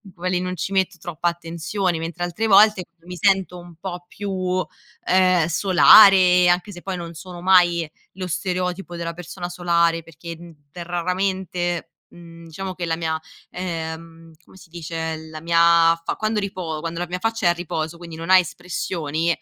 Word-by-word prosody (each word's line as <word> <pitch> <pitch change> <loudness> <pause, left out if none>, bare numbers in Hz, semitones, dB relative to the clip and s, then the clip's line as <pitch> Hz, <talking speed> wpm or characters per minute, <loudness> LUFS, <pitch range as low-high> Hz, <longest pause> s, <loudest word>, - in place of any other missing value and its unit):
quelli 180 0 -1
non 185 0 -3
ci 175 +4 -3
metto 190 -1 0
troppa 175 +1 -2
attenzione. 170 +2 -3
Mentre 170 +2 -5
altre 175 +6 -2
volte 205 -2 +6 0.2
mi 180 - -8
sento 190 -1 +1
un 175 -1 -13
po' 175 +1 -7
più, 185 -2 -2 0.4
ehm, 185 -2 +3
solare, 185 0 +6
anche 180 +3 0
se 175 - -10
poi 190 0 -4
non 170 -1 -7
sono 175 +1 -10
mai 175 -3 +4 0.2
lo 185 0 -6
stereotipo 180 +1 -3
della 170 0 -4
persona 175 +1 -7
solare, 170 -2 +1
perché, 165 +1 -9
mhmm, 170 0 -13 0.2
raramente, 175 0 -2 0.2
mhmm 170 -1 -14
diciamo 185 +4 -6
che 175 -1 -5
la 165 - -1
mia, 160 -1 -2 0.3
ehm 165 -2 -6
come - - -19
si 190 -3 -16
dice, 160 -1 -5
la 155 0 -9
mia 170 +1 0 0.5
fa - - -1
quando 215 0 -1
ripo 180 -6 -4
quando 165 +1 -5
la 175 - -3
mia 180 +1 -4
faccia 225 -2 0
è - - +6
a - - +3
riposo, 170 -1 -4
quindi 170 -2 -10
non 165 +2 -7
ha 190 - +8
espressioni, 170 -2 -2
175 Hz, 170 wpm, -22 LUFS, 165-185 Hz, 0.5 s, ha